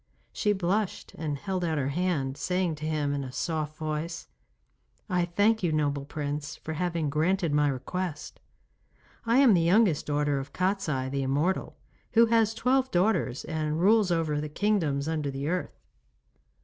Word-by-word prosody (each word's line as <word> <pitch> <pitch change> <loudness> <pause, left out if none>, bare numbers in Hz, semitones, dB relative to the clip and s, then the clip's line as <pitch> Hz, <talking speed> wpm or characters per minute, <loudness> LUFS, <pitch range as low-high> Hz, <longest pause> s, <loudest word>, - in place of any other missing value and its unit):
She 210 - +1
blushed 195 +1 -1
and 150 -3 -3
held 185 +3 -3
out 160 -2 0
her 140 -1 0
hand, 145 -4 -1
saying 180 +1 -1
to 155 +1 -4
him 150 -2 0
in 140 -1 -2
a 130 - -7
soft 155 +1 -3
voice: 155 +2 -4 0.8
'I 180 -1 +2
thank 205 +6 +2
you, 175 -3 +1
noble 145 -2 0
Prince, 145 0 -4
for 160 - -6
having 170 -1 -1
granted 165 +2 +1
my 150 0 +3
request. 150 +5 -4 0.9
I 230 +2 +4
am 265 -5 +7
the 175 - +4
youngest 175 -1 +3
daughter 145 -1 +1
of 135 - -8
Kostiei 185 -9 0
the 140 0 -1
immortal, 145 +8 -1 0.4
who 230 +1 +7
has 225 -1 +2
twelve 260 +3 +2
daughters 175 - +1
and 155 -1 -2
rules 205 +2 +4
over 160 -3 0
the 150 - -4
kingdoms 155 -6 0
under 155 -3 -1
the 135 +1 -4
earth. 180 +2 -3
160 Hz, 160 wpm, -28 LUFS, 145-190 Hz, 0.9 s, am